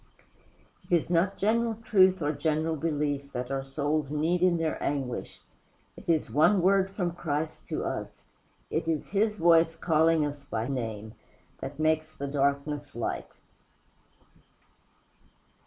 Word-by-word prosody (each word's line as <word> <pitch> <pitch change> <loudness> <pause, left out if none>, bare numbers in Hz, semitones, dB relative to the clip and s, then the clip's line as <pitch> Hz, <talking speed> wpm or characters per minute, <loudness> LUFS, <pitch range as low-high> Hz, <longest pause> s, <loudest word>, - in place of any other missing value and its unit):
It 175 - +4
is 170 +1 0
not 180 +3 +2
general 230 +2 +1
truth 190 -5 +3
or 145 - +1
general 155 +2 0
belief 145 -3 -2
that 125 +1 -4
our 135 0 -1
souls 145 +1 -1
need 160 +4 +1
in 180 -2 +4
their 165 -1 -2
anguish; 135 -4 -3 0.5
it - - -11
is 160 -2 +1
one 185 +7 +4
word 195 0 +4
from 180 -3 -2
Christ 155 -2 -3
to - - -3
us, - - -5 0.5
it - - -1
is 160 -3 -1
his 210 +2 +1
voice 165 -3 +4
calling 160 -1 +3
us 145 -1 -5
by 115 -4 -3
name, 110 -5 -4 0.5
that 140 - -6
makes 155 0 0
the 140 - -5
darkness 140 0 -1
light. 120 - -3
155 Hz, 140 wpm, -28 LUFS, 140-175 Hz, 0.5 s, It